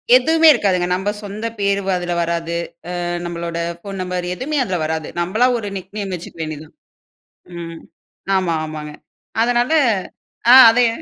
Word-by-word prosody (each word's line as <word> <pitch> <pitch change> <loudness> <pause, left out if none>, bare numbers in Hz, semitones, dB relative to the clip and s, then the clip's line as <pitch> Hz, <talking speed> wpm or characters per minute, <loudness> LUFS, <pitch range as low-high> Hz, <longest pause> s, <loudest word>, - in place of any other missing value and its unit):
எதுவுமே 320 +5 +4
இருக்காதுங்க. 190 -8 +1
நம்ம 195 +3 -1
சொந்த 205 +3 -6
பேரு 200 0 +1
வ - - -2
அதுல 175 0 -3
வராது. 170 0 -2 0.5
அ - - -2 0.2
நம்மளோட 170 -1 -4 0.2
ஃபோன் 195 +2 -8
நம்பர் 180 -1 -3
எதுவுமே 290 +7 -3
அதுல 185 -5 -2
வராது. 160 -1 -3
நம்மளா 215 +8 +2
ஒரு 210 - -5
நிக் 190 +2 -9
நேம் 195 -2 -4
வைத்துக்க 170 -1 -9
வேண்டியதுதான். 155 -1 -7 0.8
ம். 165 -1 -7 0.6
ஆமா, 180 -3 0
ஆமாங்க. 155 -1 -7 0.5
அதனால 245 +4 +1 0.8
ஆ - - +10 0.2
அதே 245 +1 +3
185 Hz, 145 wpm, -19 LUFS, 170-215 Hz, 0.8 s, ஆ